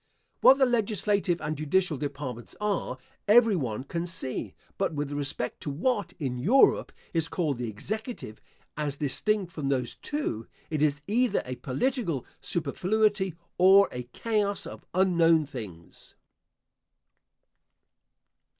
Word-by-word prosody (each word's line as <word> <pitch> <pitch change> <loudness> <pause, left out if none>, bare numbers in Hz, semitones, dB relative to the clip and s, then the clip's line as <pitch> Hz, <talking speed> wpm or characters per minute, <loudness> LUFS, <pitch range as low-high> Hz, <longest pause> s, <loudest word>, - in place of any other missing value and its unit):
What 270 - +8
the 270 - +5
legislative 205 -6 +1
and 155 0 -2
judicial 155 +3 +1
departments 130 -4 -5
are 205 -10 -1 0.3
every 225 0 +6
one 125 -7 -2
can 170 +5 -3
see; 130 -6 -4 0.2
but 160 - 0
with 145 -1 -2
respect 145 -3 -3
to - - -4
what, 205 - 0
in 130 -6 -3
Europe, 225 - +4 0.2
is 165 -1 +1
called 150 -9 -1
the 120 -2 -2
executive, 215 - -5 0.3
as 145 -2 -2
distinct 185 +7 0
from 145 -4 -3
those 130 -3 0
two, 290 - -3 0.2
it 155 -2 -1
is 145 -2 +1
either 240 +4 +1
a 125 0 -5
political 165 - -1
superfluity 190 +4 0 0.2
or 195 +2 +7
a 125 0 -6
chaos 210 - -1
of - - -9
unknown 170 -4 +4
things. 105 - -10
165 Hz, 125 wpm, -28 LUFS, 140-205 Hz, 0.3 s, What